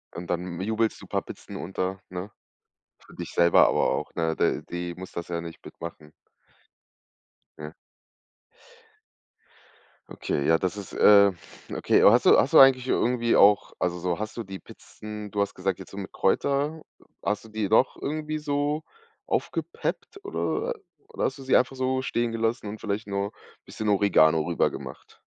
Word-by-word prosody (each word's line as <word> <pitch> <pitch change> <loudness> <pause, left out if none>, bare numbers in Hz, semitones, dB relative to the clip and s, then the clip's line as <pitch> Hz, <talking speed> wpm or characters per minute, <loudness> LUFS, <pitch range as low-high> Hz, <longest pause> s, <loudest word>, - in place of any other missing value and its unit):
Und 85 0 -7
dann 90 0 -3
jubelst 110 +2 -1
du - - -12
paar - - -1
Pizzen - - -11
unter, 95 +2 -4
ne? 90 +3 -6 0.7
Für - - -18
dich - - -7
selber 85 0 +5
aber - - +2
auch, - - -3
ne? 80 -1 0
D - - +1
die 85 0 -4
muss 95 0 -9
das 85 - -6
ja 85 -1 -3
nicht 85 -1 -10
mitmachen. 80 -2 -10 1.5
Ne? 75 +1 -8 2.4
Okay, 70 - -3
ja 80 0 +5
das 95 +3 -2
ist, 100 - -8
äh 100 -2 +6 0.4
okay. - - +2
Aber - - +8
hast - - +3
du - - +7
hast - - +1
du - - +9
eigentlich 130 -1 +6
irgendwie 120 -2 +1
auch 100 0 +5
also, 90 -1 -1
so, 90 -1 -1
hast 110 +2 -5
du 115 - -3
die 95 -1 -8
Pizzen 105 -1 -10
du 100 - 0
hast 100 - -1
gesagt 95 0 -2
jetzt 95 - -11
so 100 - -10
mit 95 - -7
Kräuter 140 +9 0 0.4
hast 105 +1 -2
du 110 - -14
die 105 -2 -2
noch 115 +5 +3
irgendwie 155 +1 -3
so 145 +1 -1 0.4
aufgepeppt, 405 -4 -3
oder 445 +3 -2 0.4
oder - - -2
hast - - -2
du 135 - -10
sie 130 - +4
einfach 130 +1 0
so 130 0 0
stehen 120 -2 -1
gelassen 115 0 -1
und 105 +1 -6
vielleicht 105 0 -3
nur 100 +1 -2 0.3
bisschen 110 -1 -4
Oregano 80 -6 +4
rübergemacht? 85 0 -3
100 Hz, 170 wpm, -26 LUFS, 90-125 Hz, 2.4 s, du